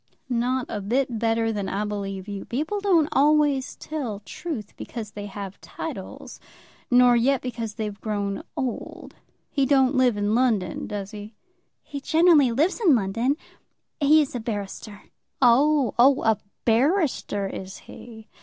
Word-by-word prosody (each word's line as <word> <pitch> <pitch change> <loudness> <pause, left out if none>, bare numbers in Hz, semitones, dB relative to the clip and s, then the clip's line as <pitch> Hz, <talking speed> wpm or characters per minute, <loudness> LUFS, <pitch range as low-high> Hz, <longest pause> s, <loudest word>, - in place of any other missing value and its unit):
"Not 250 +1 0
a 210 - -4
bit 240 +3 -1
better 225 0 +1
than 200 -2 -3
I 205 +3 -2
believe 195 -2 -5
you. 200 -1 -5
People 310 - -2
don't 360 -7 +3
always 290 -1 +2
tell 250 -10 -5
truth 225 - -6
because 220 -3 -7
they 205 0 -7
have 200 -1 -8
titles, - - -8 0.5
nor 245 0 +6
yet 255 +3 +2
because 230 -4 -5
they've 210 -3 -5
grown 205 -2 -2 0.2
old. 255 -3 -5 0.4
He 275 -2 +1
don't 265 -1 +4
live 255 -5 +3
in 205 +1 0
London; 220 -8 0
does 200 -1 -5
he?" 210 0 -9 0.5
"He 285 -2 -7
generally 315 -4 +4
lives 315 - +1
in 325 -9 +6
London. 230 +7 0 0.6
He 305 +1 +5
is 280 - -7
a 245 - -3
barrister." 205 -1 -6 0.4
"Oh, 270 +2 +4
oh; 270 +3 +5
a 220 -2 +2 0.3
barrister 255 - +1
is 190 0 -6
he. 220 -2 -12
235 Hz, 145 wpm, -24 LUFS, 210-275 Hz, 0.6 s, nor